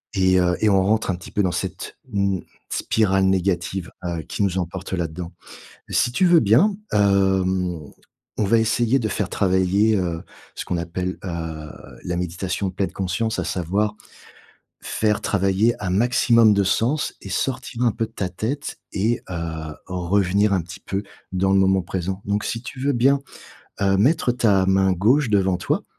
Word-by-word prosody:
et 95 Hz, -1 st, +3 dB
heu, 90 Hz, 0 st, +2 dB
et 110 Hz, -, +4 dB
on 95 Hz, -2 st, +4 dB
rentre 110 Hz, +2 st, +1 dB
un -, -, -2 dB
petit 90 Hz, -, -11 dB
peu 105 Hz, -, +1 dB
dans 90 Hz, -, +1 dB
cette, -, -, -5 dB
mmh, 100 Hz, -2 st, 0 dB, 0.3 s
spirale 95 Hz, -3 st, +1 dB
négative, 95 Hz, -1 st, 0 dB
heu, 85 Hz, -2 st, -2 dB
qui 100 Hz, -, -3 dB
nous 95 Hz, -2 st, 0 dB
emporte 90 Hz, +2 st, -5 dB
là-dedans. 85 Hz, 0 st, -3 dB, 0.6 s
Si 120 Hz, -, +2 dB
tu 155 Hz, +9 st, +2 dB
veux 175 Hz, -2 st, +6 dB
bien, 135 Hz, -, +4 dB, 0.2 s
hem, 95 Hz, -3 st, +2 dB, 0.6 s
on -, -, +1 dB
va 115 Hz, +3 st, +3 dB
essayer 115 Hz, +3 st, +2 dB
de 110 Hz, -, -1 dB
faire 100 Hz, -2 st, -2 dB
travailler, 95 Hz, +3 st, +2 dB
heu, 85 Hz, -3 st, -2 dB, 0.3 s
ce -, -, -5 dB
qu'on -, -, -2 dB
appelle, 90 Hz, +2 st, -3 dB
heu, 80 Hz, -4 st, -5 dB, 0.3 s
la 90 Hz, 0 st, -2 dB
méditation 90 Hz, +2 st, -2 dB
pleine 95 Hz, -1 st, -2 dB
conscience, 100 Hz, +6 st, -2 dB
à -, -, -1 dB
savoir, 100 Hz, +5 st, -1 dB, 0.9 s
faire 105 Hz, -1 st, 0 dB
travailler 100 Hz, +4 st, +2 dB
un 95 Hz, -, -1 dB
maximum 115 Hz, +1 st, +4 dB
de 100 Hz, 0 st, +2 dB
sens 120 Hz, +10 st, 0 dB
et -, -, -9 dB
sortir 125 Hz, +4 st, -2 dB
un 120 Hz, -2 st, +3 dB
peu 115 Hz, +1 st, -2 dB
de 110 Hz, -, -23 dB
ta 95 Hz, -5 st, -3 dB
tête 120 Hz, +10 st, -4 dB, 0.2 s
et 110 Hz, +4 st, +1 dB
heu, -, -, -4 dB, 0.5 s
revenir 95 Hz, +3 st, +1 dB
un 90 Hz, -, +1 dB
petit 90 Hz, +3 st, -11 dB
peu 100 Hz, +1 st, -3 dB, 0.3 s
dans 95 Hz, +1 st, +1 dB
le 95 Hz, -, +4 dB
moment 95 Hz, 0 st, +3 dB
présent, 95 Hz, +2 st, -4 dB
donc 100 Hz, +1 st, -1 dB
si 115 Hz, -, -3 dB
tu 130 Hz, 0 st, -8 dB
veux 140 Hz, +2 st, +1 dB
bien, 135 Hz, +3 st, +3 dB, 0.6 s
heu, 95 Hz, -1 st, +3 dB
mettre 125 Hz, -, +3 dB
ta 105 Hz, -6 st, +2 dB
main 95 Hz, 0 st, +3 dB
gauche 120 Hz, -, +2 dB
devant 95 Hz, -3 st, +2 dB
toi, 85 Hz, -, -1 dB
95 Hz, 175 wpm, -22 LUFS, 90-110 Hz, 0.9 s, veux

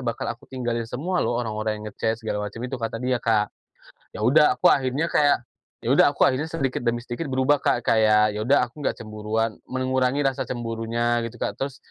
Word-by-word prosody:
bakal 120 Hz, -2 st, -3 dB
aku 120 Hz, -, -18 dB
tinggalin 120 Hz, -3 st, -3 dB
semua 175 Hz, +10 st, -2 dB
loh 120 Hz, -, 0 dB
orang-orang 110 Hz, -2 st, -3 dB
yang 105 Hz, -, -7 dB
nge-chat, 110 Hz, 0 st, -1 dB
segala 105 Hz, -2 st, -3 dB
macam 110 Hz, +3 st, -10 dB
itu." 125 Hz, +1 st, -4 dB
Kata 115 Hz, 0 st, -3 dB
dia, 125 Hz, 0 st, -1 dB
Kak. 110 Hz, -2 st, +1 dB, 0.6 s
Ya 105 Hz, -, -4 dB
udah 150 Hz, +5 st, +5 dB
aku 180 Hz, -, +6 dB
akhirnya 135 Hz, +3 st, 0 dB
kayak 145 Hz, -6 st, +2 dB, 0.3 s
ya -, -, 0 dB
udah -, -, +6 dB
aku -, -, +2 dB
akhirnya 145 Hz, +5 st, 0 dB
sedikit 135 Hz, -7 st, -2 dB
demi 120 Hz, 0 st, -1 dB
sedikit 135 Hz, +6 st, -4 dB
berubah, 130 Hz, +2 st, +2 dB
Kak, 120 Hz, -, +1 dB
kayak 110 Hz, -1 st, +4 dB
ya 105 Hz, -, -4 dB
udah 125 Hz, +3 st, +3 dB
aku 135 Hz, +5 st, -13 dB
nggak -, -, -1 dB
cemburuan, 110 Hz, +1 st, -2 dB, 0.2 s
mengurangi 130 Hz, +2 st, 0 dB
rasa 135 Hz, -1 st, 0 dB
cemburunya 120 Hz, 0 st, -1 dB
gitu, 115 Hz, +1 st, -6 dB
Kak. -, -, -2 dB
Terus 135 Hz, 0 st, -5 dB
120 Hz, 200 wpm, -24 LUFS, 115-130 Hz, 0.6 s, aku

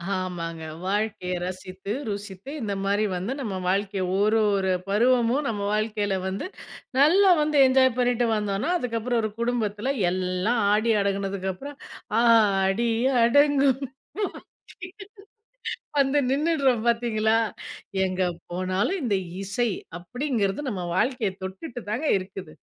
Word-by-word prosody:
ஆமாங்க. 170 Hz, -3 st, -4 dB, 0.2 s
வாழ்க்கைய 205 Hz, -2 st, -1 dB
ரசித்து, 185 Hz, +2 st, -6 dB, 0.2 s
ருசித்து, 200 Hz, +3 st, -6 dB
இந்த 205 Hz, -2 st, -2 dB
மாரி 205 Hz, +2 st, +1 dB
வந்து 185 Hz, +7 st, -3 dB
நம்ம 215 Hz, -8 st, -3 dB
வாழ்க்கைய 195 Hz, 0 st, 0 dB, 0.2 s
1 215 Hz, +2 st, +3 dB, 0.2 s
1 190 Hz, -1 st, 0 dB, 0.2 s
பருவமும் 245 Hz, +5 st, +3 dB
நம்ம 205 Hz, -3 st, -2 dB
வாழ்க்கையில 210 Hz, -2 st, 0 dB
வந்து, 190 Hz, -, -3 dB, 0.5 s
நல்லா 370 Hz, +7 st, +6 dB
வந்து 300 Hz, -1 st, +1 dB
என்ஜாய் 260 Hz, 0 st, +4 dB
பண்ணிட்டு 245 Hz, -1 st, +2 dB
வந்தோன்னா, 210 Hz, -, -1 dB
அதுக்கப்பறம் 235 Hz, -3 st, -1 dB
1 215 Hz, -, -1 dB
குடும்பத்தில 235 Hz, +1 st, -1 dB, 0.2 s
எல்லாம் 185 Hz, +5 st, 0 dB
ஆடி 220 Hz, +2 st, +2 dB
அடங்குனதுக்கப்பறம், 195 Hz, +6 st, -3 dB, 0.4 s
ஆடி 215 Hz, -1 st, +4 dB, 0.3 s
அடங்கும் 280 Hz, +1 st, +4 dB, 2.2 s
வந்து 275 Hz, +1 st, +3 dB
நின்னுடுறோம் 275 Hz, -5 st, +2 dB
பார்த்தீங்களா? 225 Hz, -2 st, +2 dB, 0.7 s
எங்க 185 Hz, 0 st, -3 dB, 0.3 s
போனாலும், 185 Hz, -, -1 dB
இந்த 210 Hz, -5 st, +1 dB, 0.3 s
"இசை" 220 Hz, +4 st, 0 dB, 0.3 s
அப்படிங்கிறது 235 Hz, +1 st, -1 dB
நம்ம 185 Hz, -4 st, -4 dB
வாழ்க்கைய 235 Hz, -3 st, +1 dB
தொட்டுட்டு 230 Hz, +7 st, -6 dB
தாங்க 235 Hz, +8 st, -2 dB
இருக்குது. 185 Hz, -3 st, -8 dB
215 Hz, 110 wpm, -25 LUFS, 195-245 Hz, 2.2 s, நல்லா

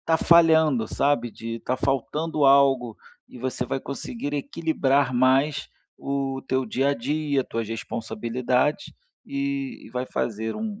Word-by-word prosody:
estar 165 Hz, -, +2 dB
falhando, 160 Hz, -8 st, +5 dB
sabe, 140 Hz, -4 st, +1 dB
de 115 Hz, +1 st, -6 dB
estar 130 Hz, +2 st, -2 dB
faltando 150 Hz, +4 st, -1 dB
algo, 135 Hz, -4 st, +4 dB, 0.3 s
e -, -, -12 dB
você 125 Hz, 0 st, -2 dB
vai 135 Hz, -, -2 dB
conseguir 145 Hz, -, -5 dB
equilibrar 140 Hz, -3 st, 0 dB
mais 135 Hz, +3 st, +2 dB, 0.3 s
o 135 Hz, -1 st, -2 dB
teu 130 Hz, 0 st, +1 dB
dia 130 Hz, +5 st, 0 dB
a -, -, 0 dB
dia, 145 Hz, +1 st, -1 dB
tuas 115 Hz, -2 st, -4 dB
responsabilidades, 120 Hz, -, -1 dB, 0.4 s
eh, -, -, -19 dB, 0.6 s
e -, -, -14 dB
vai 125 Hz, 0 st, -2 dB
fazer 110 Hz, 0 st, -3 dB
um 215 Hz, -1 st, -5 dB
135 Hz, 140 wpm, -25 LUFS, 125-145 Hz, 0.6 s, falhando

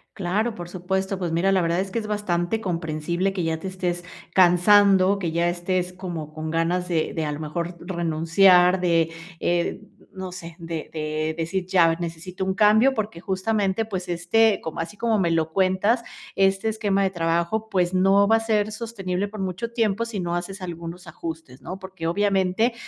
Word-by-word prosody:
Claro, 210 Hz, +4 st, -1 dB
por 175 Hz, -3 st, -7 dB
supuesto, 190 Hz, +2 st, -2 dB
pues 175 Hz, -3 st, -3 dB
mira, 180 Hz, +4 st, +2 dB
la 190 Hz, -, +3 dB
verdad 170 Hz, +1 st, +1 dB
es 190 Hz, 0 st, -2 dB
que 230 Hz, -, -1 dB
es 215 Hz, -, -6 dB
bastante 205 Hz, -1 st, -1 dB
comprensible 170 Hz, 0 st, -2 dB
que 185 Hz, -3 st, -3 dB
ya 160 Hz, 0 st, 0 dB
te 190 Hz, -, -6 dB
estés 180 Hz, -2 st, -3 dB, 0.3 s
cansando, 190 Hz, +2 st, +5 dB
que 170 Hz, -4 st, -2 dB
ya 170 Hz, +1 st, +1 dB
estés 180 Hz, +1 st, -2 dB
como 170 Hz, -5 st, -6 dB
con 155 Hz, 0 st, -5 dB
ganas 175 Hz, +2 st, 0 dB
de 165 Hz, -3 st, 0 dB
de 160 Hz, -, -2 dB
a 150 Hz, -, -2 dB
lo 145 Hz, -, -5 dB
mejor 170 Hz, +3 st, -4 dB
renunciar, 180 Hz, +2 st, +3 dB
de, 165 Hz, -2 st, +2 dB, 0.3 s
eh, 175 Hz, +1 st, 0 dB
n 205 Hz, -, -17 dB, 0.2 s
no 190 Hz, -1 st, -7 dB
sé, 170 Hz, -2 st, -9 dB
de 165 Hz, -2 st, -5 dB
de 155 Hz, 0 st, -2 dB
decir 175 Hz, +3 st, -2 dB
ya 170 Hz, -3 st, +4 dB
necesito 175 Hz, +3 st, -5 dB
un 190 Hz, -, 0 dB
cambio, 220 Hz, +6 st, +5 dB
porque 210 Hz, -7 st, -4 dB
justamente, 195 Hz, +2 st, 0 dB
pues 185 Hz, -4 st, -5 dB
este, 195 Hz, +5 st, +3 dB
como 160 Hz, -, -6 dB
así 205 Hz, +5 st, -7 dB
como 225 Hz, -1 st, +1 dB
me 170 Hz, -3 st, +1 dB
lo 160 Hz, -1 st, 0 dB
cuentas, 195 Hz, +5 st, +2 dB, 0.3 s
este 195 Hz, +2 st, +2 dB
esquema 210 Hz, -3 st, +1 dB
de 190 Hz, -, +1 dB
trabajo, 170 Hz, +5 st, -1 dB
pues 180 Hz, -2 st, +1 dB
no 195 Hz, +2 st, +4 dB
va 225 Hz, +1 st, +5 dB
a -, -, 0 dB
ser 215 Hz, -1 st, +1 dB
sostenible 205 Hz, -4 st, -3 dB
por 210 Hz, 0 st, -9 dB
mucho 190 Hz, +5 st, -3 dB
tiempo 225 Hz, -2 st, 0 dB
si 225 Hz, -3 st, -5 dB
no 175 Hz, -1 st, -2 dB
haces 190 Hz, +3 st, -5 dB
algunos 170 Hz, 0 st, -7 dB
ajustes, 160 Hz, -4 st, -8 dB
¿no? 185 Hz, +1 st, -7 dB
Porque 185 Hz, -3 st, -6 dB
obviamente 195 Hz, +4 st, +1 dB
185 Hz, 190 wpm, -24 LUFS, 170-200 Hz, 0.3 s, cansando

